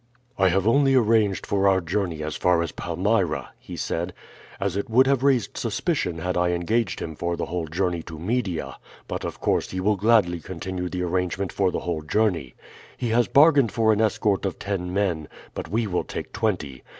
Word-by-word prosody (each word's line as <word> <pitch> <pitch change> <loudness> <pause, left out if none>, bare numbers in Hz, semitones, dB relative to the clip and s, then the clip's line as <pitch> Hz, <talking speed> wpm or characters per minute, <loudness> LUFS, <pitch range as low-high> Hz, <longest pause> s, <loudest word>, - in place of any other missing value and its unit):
"I 95 - +3
have 95 +2 +1
only 135 +2 +4
arranged 110 -5 +3
for 100 0 +1
our 95 -1 +4
journey 85 -2 -2
as 75 -1 -4
far 90 -2 +2
as 85 - -4
Palmyra," 90 -1 -1
he - - -9
said, 85 +2 -2 0.5
"as 95 -2 -1
it 100 - -2
would 125 +4 +5
have 135 -2 +2
raised 130 -5 +1
suspicion 85 -2 -1
had 90 +3 -2
I 90 0 +2
engaged 90 +3 0
him 80 - -5
for 85 +2 -2
the - - -2
whole 85 -2 -3
journey 85 +1 -1
to 80 - -7
Media; 95 -1 -2 0.3
but - - -4
of - - -5
course - - 0
he 95 - -4
will 105 +2 +2
gladly 100 -4 +3
continue 90 +2 -5
the 90 0 -3
arrangement 90 +2 -1
for 95 -2 +2
the - - -3
whole 85 -3 -2
journey. 80 - 0 0.4
He 120 - -2
has 120 +1 +3
bargained 140 -5 +5
for 110 -1 +3
an 105 - +1
escort 105 -2 +1
of 95 -2 -2
ten 95 -3 -3
men, 90 -6 0 0.3
but - - -5
we 110 +6 0
will 90 -4 -1
take - - -6
twenty. 80 - -2
95 Hz, 200 wpm, -24 LUFS, 85-110 Hz, 0.5 s, would